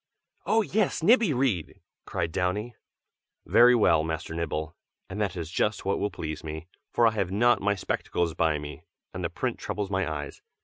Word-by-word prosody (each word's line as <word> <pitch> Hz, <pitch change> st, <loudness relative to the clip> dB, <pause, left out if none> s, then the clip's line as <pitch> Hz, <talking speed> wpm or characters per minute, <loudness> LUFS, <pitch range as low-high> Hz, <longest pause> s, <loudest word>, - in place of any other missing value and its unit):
"Oh! 225 Hz, 0 st, +3 dB
yes, 200 Hz, -4 st, 0 dB
Nibby, 225 Hz, -1 st, +5 dB
read!" 125 Hz, -, -1 dB, 0.3 s
cried 85 Hz, -, -2 dB
Downy. 95 Hz, +7 st, -1 dB, 0.7 s
"Very 125 Hz, +1 st, +6 dB
well, 85 Hz, -9 st, +4 dB
Master 80 Hz, 0 st, -4 dB
Nibble, 80 Hz, -2 st, -3 dB, 0.3 s
and 105 Hz, +3 st, -5 dB
that 100 Hz, -3 st, -1 dB
is 85 Hz, -1 st, -5 dB
just 105 Hz, +2 st, 0 dB
what 100 Hz, -, 0 dB
will 105 Hz, -, 0 dB
please 80 Hz, -5 st, -6 dB
me, 80 Hz, +1 st, -6 dB, 0.3 s
for 120 Hz, -, +3 dB
I 115 Hz, -, +5 dB
have 100 Hz, -5 st, -1 dB
not 120 Hz, +5 st, +3 dB
my 100 Hz, +1 st, +1 dB
spectacles 85 Hz, -2 st, -2 dB
by 80 Hz, -1 st, +1 dB
me, 75 Hz, 0 st, -8 dB, 0.3 s
and -, -, -5 dB
the -, -, -1 dB
print -, -, -3 dB
troubles 100 Hz, -2 st, -4 dB
my 95 Hz, -4 st, 0 dB
eyes. 75 Hz, -2 st, -6 dB
95 Hz, 180 wpm, -27 LUFS, 80-115 Hz, 0.7 s, Very